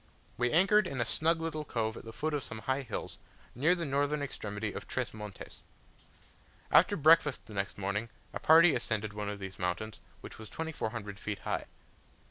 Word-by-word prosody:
We 120 Hz, 0 st, +1 dB
anchored 195 Hz, +4 st, +5 dB
in 135 Hz, -6 st, -4 dB
a 120 Hz, -, +2 dB
snug 165 Hz, +6 st, +1 dB
little 160 Hz, -2 st, -3 dB
cove 110 Hz, -5 st, -2 dB
at -, -, -9 dB
the 115 Hz, -, -7 dB
foot 155 Hz, +6 st, -2 dB
of 145 Hz, -, 0 dB
some 110 Hz, -, -7 dB
high 130 Hz, +5 st, 0 dB
hills, 130 Hz, -, -5 dB, 0.3 s
near 155 Hz, +9 st, +3 dB
the 170 Hz, -2 st, -3 dB
northern 145 Hz, +1 st, 0 dB
extremity 105 Hz, -5 st, -4 dB
of -, -, -7 dB
Tres 130 Hz, -2 st, -2 dB
Montes. 105 Hz, -2 st, -9 dB, 1.1 s
After 205 Hz, -, +6 dB
breakfast 155 Hz, -2 st, +5 dB
the 110 Hz, -, -11 dB
next 100 Hz, 0 st, -2 dB
morning, 100 Hz, +3 st, -2 dB, 0.2 s
a -, -, -3 dB
party 160 Hz, 0 st, +7 dB
ascended 110 Hz, -1 st, -1 dB
one 105 Hz, -1 st, -3 dB
of 105 Hz, -, -4 dB
these 95 Hz, -1 st, -8 dB
mountains, 90 Hz, +4 st, -2 dB, 0.2 s
which -, -, -10 dB
was 110 Hz, -, -9 dB
2400 110 Hz, -10 st, -4 dB
feet 105 Hz, -1 st, -4 dB
high. -, -, -2 dB
120 Hz, 185 wpm, -31 LUFS, 105-155 Hz, 1.1 s, party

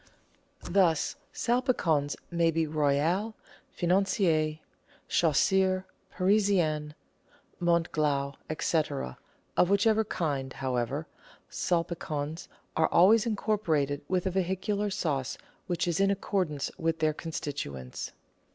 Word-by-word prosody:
Thus 175 Hz, -4 st, +2 dB, 0.2 s
Salpicons 205 Hz, -, +1 dB, 0.2 s
may 170 Hz, -1 st, +3 dB
be 165 Hz, 0 st, +1 dB
Royal, 155 Hz, +8 st, +1 dB, 0.3 s
Financier, 175 Hz, -4 st, +1 dB, 0.5 s
Chasseur, 185 Hz, +4 st, +2 dB, 0.3 s
Parisien, 185 Hz, -7 st, +2 dB, 0.7 s
Montglas, 155 Hz, -5 st, +1 dB, 0.3 s
&c.; 160 Hz, -, +3 dB, 0.7 s
of 180 Hz, -, +4 dB
whichever 215 Hz, +2 st, +4 dB
kind, 140 Hz, -9 st, -2 dB
however, 130 Hz, +3 st, -2 dB, 0.5 s
Salpicons 165 Hz, -2 st, -2 dB, 0.3 s
are 160 Hz, -, +3 dB
always 210 Hz, +6 st, +5 dB
incorporated 165 Hz, -10 st, 0 dB
with 185 Hz, 0 st, 0 dB
a 190 Hz, -, +1 dB
vehicular 190 Hz, +3 st, -1 dB
sauce 145 Hz, -9 st, -2 dB, 0.3 s
which 175 Hz, -1 st, -1 dB
is 170 Hz, 0 st, 0 dB
in 195 Hz, 0 st, +4 dB
accord 195 Hz, -2 st, 0 dB
ance 145 Hz, -2 st, -3 dB
with 165 Hz, -1 st, 0 dB
their 155 Hz, -1 st, +1 dB
constituents. 145 Hz, -, -5 dB
170 Hz, 95 wpm, -29 LUFS, 150-190 Hz, 0.7 s, always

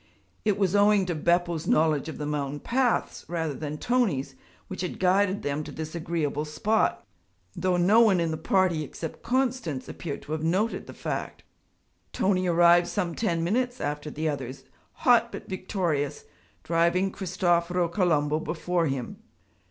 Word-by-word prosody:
It 210 Hz, -2 st, +1 dB
was 195 Hz, -1 st, +1 dB
owing 205 Hz, -1 st, +4 dB
to 180 Hz, -, -1 dB
Beppo's 170 Hz, 0 st, 0 dB
knowledge 155 Hz, -1 st, +2 dB
of -, -, -7 dB
the 150 Hz, -, -4 dB
mountain 145 Hz, -1 st, -2 dB
paths 245 Hz, -, 0 dB
rather 165 Hz, -3 st, -2 dB
than 150 Hz, +2 st, -5 dB
Tony's 195 Hz, -, 0 dB, 0.3 s
which 185 Hz, -, -6 dB
had 180 Hz, -, -4 dB
guided 190 Hz, +2 st, +2 dB
them 145 Hz, +1 st, -2 dB
to -, -, -8 dB
this 155 Hz, 0 st, -6 dB
agreeable 160 Hz, -3 st, -2 dB
spot; 155 Hz, -, 0 dB, 0.5 s
though 180 Hz, 0 st, +1 dB
no 200 Hz, +6 st, +5 dB
one 205 Hz, -6 st, +5 dB
in 165 Hz, -1 st, 0 dB
the -, -, -1 dB
party 170 Hz, -1 st, +1 dB
except 160 Hz, +2 st, -7 dB
Constance 245 Hz, -, -1 dB
appeared 150 Hz, -5 st, -6 dB
to -, -, -10 dB
have 155 Hz, 0 st, -2 dB
noted 185 Hz, +8 st, 0 dB
the -, -, -10 dB
fact. -, -, -4 dB, 0.7 s
Tony 185 Hz, -1 st, +1 dB
arrived 175 Hz, 0 st, +5 dB
some 180 Hz, -5 st, -2 dB
ten 170 Hz, -4 st, -1 dB
minutes 245 Hz, +7 st, 0 dB
after 150 Hz, +1 st, -3 dB
the 155 Hz, +2 st, -3 dB
others, 135 Hz, -2 st, -4 dB, 0.4 s
hot 235 Hz, -2 st, +5 dB
but -, -, -8 dB
victorious, 180 Hz, -6 st, -2 dB, 0.4 s
driving 170 Hz, +3 st, +2 dB
Cristoforo 175 Hz, -2 st, 0 dB
Colombo 155 Hz, -5 st, +1 dB
before 170 Hz, +1 st, -1 dB
him. 135 Hz, -3 st, -4 dB
170 Hz, 155 wpm, -27 LUFS, 155-190 Hz, 0.7 s, no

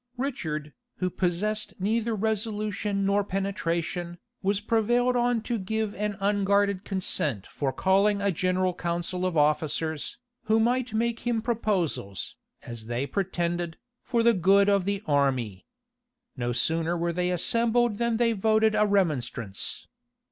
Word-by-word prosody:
Richard, 155 Hz, -, -3 dB, 0.2 s
who 185 Hz, -1 st, -2 dB
possessed 210 Hz, +5 st, -1 dB
neither 225 Hz, +3 st, 0 dB
resolution 210 Hz, -1 st, -1 dB
nor 200 Hz, +1 st, +2 dB
penetration, 175 Hz, -3 st, -2 dB, 0.2 s
was 200 Hz, 0 st, +1 dB
prevailed 240 Hz, +3 st, +2 dB
on 240 Hz, -2 st, +1 dB
to 235 Hz, -1 st, -2 dB
give 215 Hz, +2 st, -2 dB
an 210 Hz, -1 st, -3 dB
unguarded 200 Hz, -1 st, +2 dB
consent 155 Hz, -, -1 dB
for 140 Hz, -2 st, -2 dB
calling 200 Hz, +5 st, +2 dB
a 200 Hz, 0 st, +1 dB
general 185 Hz, +1 st, +1 dB
council 175 Hz, +1 st, -2 dB
of 175 Hz, -3 st, -2 dB
officers, 150 Hz, +1 st, 0 dB, 0.3 s
who 220 Hz, +1 st, +3 dB
might 245 Hz, +2 st, +1 dB
make 235 Hz, +1 st, 0 dB
him 240 Hz, -2 st, 0 dB
proposals, 200 Hz, -, -1 dB, 0.3 s
as 115 Hz, -2 st, -8 dB
they 120 Hz, +3 st, -1 dB
pretended, 175 Hz, -2 st, -2 dB, 0.2 s
for 235 Hz, -2 st, 0 dB
the 235 Hz, 0 st, +5 dB
good 195 Hz, +2 st, +4 dB
of 200 Hz, -2 st, +3 dB
the 200 Hz, 0 st, -1 dB
army. 130 Hz, -9 st, 0 dB, 0.7 s
No 120 Hz, -2 st, -2 dB
sooner 165 Hz, +7 st, +1 dB
were 170 Hz, 0 st, -1 dB
they 180 Hz, +1 st, 0 dB
assembled 230 Hz, +5 st, +1 dB
than 235 Hz, -1 st, +1 dB
they 230 Hz, -1 st, +3 dB
voted 220 Hz, +1 st, +3 dB
a 210 Hz, 0 st, +3 dB
remonstrance. 130 Hz, -, -1 dB
195 Hz, 135 wpm, -27 LUFS, 170-220 Hz, 0.7 s, the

